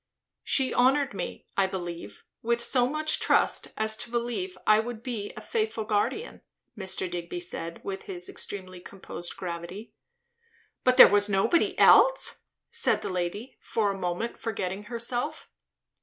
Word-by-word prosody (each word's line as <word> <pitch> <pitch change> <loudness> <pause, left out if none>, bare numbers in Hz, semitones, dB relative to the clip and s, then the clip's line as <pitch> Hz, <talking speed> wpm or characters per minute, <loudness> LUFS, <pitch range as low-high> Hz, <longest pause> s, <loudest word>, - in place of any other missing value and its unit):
"She 265 -2 +2
honoured 265 +1 +3
me, - - -6
I 195 -1 +3
believe, 175 -3 -7 0.2
with 235 +1 0
so 245 +1 +3
much 310 +3 +1
trust - - +2
as 220 0 +1
to - - -3
believe 240 +11 -3
I 215 0 +6
would 230 0 -5
be 225 -5 -4
a - - -6
faithful 435 - -2
guardian," 215 - -1 0.3
Mr. 190 -2 -2
Digby 175 0 -5
said, 170 -1 -5
with 195 -1 -5
his 180 -2 -6
extremely 185 -2 -7
composed 175 -1 -9
gravity. 180 +4 -6 0.9
"But 255 0 +3
was 205 0 +5
there 195 -2 +1
nobody 340 - +2
else?" - - +5 0.3
said - - +2
the - - -3
lady, 185 +8 -4
for 210 -3 0
a - - -4
moment 185 +5 -3
forgetting 195 -3 -4
herself. 235 +1 -3
210 Hz, 145 wpm, -27 LUFS, 185-245 Hz, 0.9 s, I